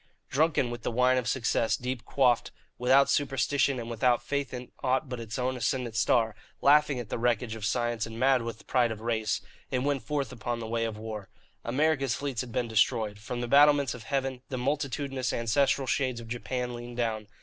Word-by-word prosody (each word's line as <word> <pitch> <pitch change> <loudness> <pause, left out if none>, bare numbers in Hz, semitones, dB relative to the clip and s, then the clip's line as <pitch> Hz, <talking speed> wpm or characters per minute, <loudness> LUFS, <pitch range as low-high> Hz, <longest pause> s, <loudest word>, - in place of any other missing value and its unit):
Drunken 145 -4 +2
with 120 0 -6
the - - -2
wine 125 +2 +3
of 120 - -4
success 115 -1 +1
deep 125 -2 -4
quaffed, 125 -4 +2 0.3
without 130 +3 +5
superstition 140 0 +1
and 115 - -5
without 120 +1 +1
faith 140 -1 -2
in 125 -1 -7
aught 130 +2 +1
but 125 -1 -5
its 115 -1 -5
own 130 0 -1
ascendant 125 -2 -1
star, 115 -1 +2 0.3
laughing 145 -1 +4
at 115 -3 -6
the - - -3
wreckage 120 -1 0
of 110 -2 -7
science 120 -1 0
and 115 0 -8
mad 130 0 +4
with 115 -1 -6
pride 125 -2 +2
of 110 -1 -6
race, 110 -2 -1 0.3
it 125 -1 -1
went 140 -1 0
forth 145 -5 -2
upon 120 -1 -3
the 115 - -5
way 115 +1 -1
of 110 -2 -4
war. 110 -3 -6 0.3
America's 135 0 +1
fleets 140 -4 -3
had 125 -2 -7
been 120 0 -1
destroyed. 110 -2 +1
From 120 +3 -5
the 120 - -2
battlements 145 -1 +5
of 115 -3 -10
heaven 135 0 -2
the 130 - -3
multitudinous 135 -1 -1
ancestral 130 +4 +1
shades 130 -2 0
of 115 - -9
Japan 125 +1 -3
leaned 120 0 -8
down. 110 -3 -1
125 Hz, 200 wpm, -28 LUFS, 115-135 Hz, 0.3 s, without